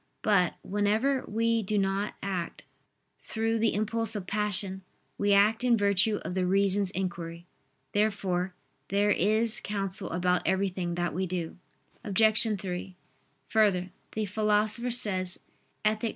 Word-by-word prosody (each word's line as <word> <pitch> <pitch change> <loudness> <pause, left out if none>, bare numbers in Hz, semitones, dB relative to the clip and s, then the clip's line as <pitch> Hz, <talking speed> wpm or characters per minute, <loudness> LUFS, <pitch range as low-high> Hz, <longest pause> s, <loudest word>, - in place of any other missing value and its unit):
But, 195 -5 +2
whenever 215 +7 +1
we 230 +1 +1
do 210 +1 -2
not 195 +1 -1
act 185 -4 -4 0.6
through 225 0 -2
the 225 -2 +1
impulse 225 +1 0
of 200 -3 -4
passion, 200 -1 -1 0.4
we 205 0 +2
act 210 +4 +4
in 240 -2 +4
virtue 200 +1 +2
of - - -4
the 185 0 0
reason's 195 +1 +2
inquiry. 170 -2 -5 0.5
Therefore 190 -3 0 0.3
there 205 +1 +2
is 220 +4 +2
counsel 195 -2 0
about 180 +1 +1
everything 185 -2 -1
that 175 -3 -2
we 185 +3 -2
do. 175 -2 -4 0.5
Obj. 215 +2 +3
3: 185 0 -5 0.5
Further, 190 -5 +2 0.2
the 215 0 -1
Philosopher 215 +3 +1
says 190 -6 +3 0.4
(Ethic. 215 +2 +1
200 Hz, 130 wpm, -28 LUFS, 185-215 Hz, 0.6 s, act